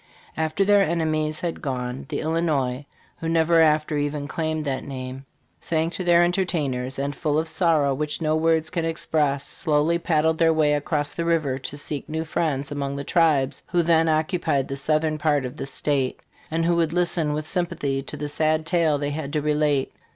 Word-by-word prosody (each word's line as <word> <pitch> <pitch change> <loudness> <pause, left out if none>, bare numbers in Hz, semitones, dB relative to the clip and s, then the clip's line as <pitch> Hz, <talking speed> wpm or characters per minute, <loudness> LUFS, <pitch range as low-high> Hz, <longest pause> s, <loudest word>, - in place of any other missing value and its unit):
"After 160 +5 0
their 205 0 +5
enemies 155 -3 0
had 170 -2 -3
gone, 125 -1 -4
the - - -2
Illinois, 150 -5 -1 0.3
who 165 -2 -3
never 165 0 +3
after 155 -1 +3
even 145 0 -2
claimed 155 0 -2
that 135 -2 -2
name, 130 0 -7 0.3
thanked 165 +3 -1
their 175 -1 +5
entertainers, 150 -8 -1
and, 140 +1 -2
full 150 -3 0
of 160 +1 0
sorrow 160 -5 +2
which 150 +2 -2
no 155 -1 +1
words 160 0 +2
can 170 -2 -1
express, 150 -3 0
slowly 160 +1 +1
paddled 160 -1 +1
their 165 -1 +5
way 150 -2 +3
across 145 0 -1
the 170 - -2
river, 155 -6 0
to 140 +2 -6
seek 145 -1 -5
new 160 +1 -2
friends 145 -4 -1
among 140 -1 -3
the 140 - -4
tribes 150 -5 +2
who 175 -1 +1
then 165 -1 +3
occupied 155 -3 +1
the 135 - -3
southern 155 +2 0
part 145 -3 +1
of 125 - -7
this 135 - -4
state, 135 -3 -1 0.3
and 165 +1 0
who 170 0 +3
would 165 -1 +1
listen 170 -3 0
with 155 +1 -3
sympathy 145 -7 -1
to 135 - -7
the 150 - -3
sad 155 +1 0
tale 165 -3 +2
they 145 0 -2
had 145 -1 -4
to 155 - 0
relate. 150 -2 +1
155 Hz, 190 wpm, -24 LUFS, 145-165 Hz, 0.3 s, their